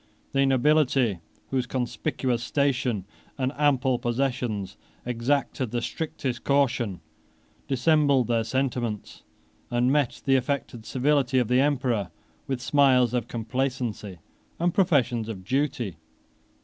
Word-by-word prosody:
The 135 0 +3
nobility, 135 - +3 0.3
whose 130 -2 0
conspicuous 120 0 -2
station, 125 -8 0 0.3
and 130 -1 0
ample 130 -4 +2
possessions, 120 -5 -2 0.3
exacted 125 +1 -1
the 120 - -1
strictest 130 -2 -4
caution, 120 - +1 0.7
dissembled 140 -1 +3
their 115 -1 +1
sentiments, 120 -4 -2 0.5
and 120 +1 +2
met 145 -4 0
the 135 -1 +4
affected 125 -4 -3
civility 130 +1 +1
of 125 -3 +2
the 125 +1 +4
emperor 125 -9 0 0.4
with 130 -2 -2
smiles 130 -3 +4
of 120 -2 -1
complacency 120 -5 -3 0.4
and 175 0 +1
professions 130 - +2
of 95 -4 -6
duty. 125 - -1
125 Hz, 110 wpm, -26 LUFS, 120-140 Hz, 0.7 s, the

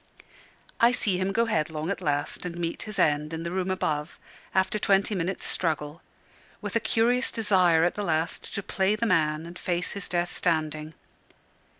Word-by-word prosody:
I 235 +1 +6
see 195 -7 +1
him 190 +1 0
go 230 +4 +2
headlong 160 -4 -1
at - - -3
last 145 -1 -1
and 175 -1 -5
meet 170 -1 -3
his 215 -2 -5
end 150 -2 +2
in 165 0 -4
the 170 - -3
room 185 0 -1
above 155 -4 -2 0.4
after 190 +2 +2
twenty 200 +1 +3
minutes' 185 0 -2
struggle, 155 -2 -2 0.6
with - - -5
a - - +4
curious 235 +3 +2
desire 185 -7 +3
at 175 - +2
the 210 - -4
last 160 -2 -1
to 200 - -2
play 190 +3 +1
the 230 - -1
man 160 -5 +2
and 170 +1 -9
face 175 0 -1
his 200 -2 -4
death 175 0 -1
standing. 155 -2 -1
180 Hz, 180 wpm, -27 LUFS, 160-200 Hz, 0.6 s, I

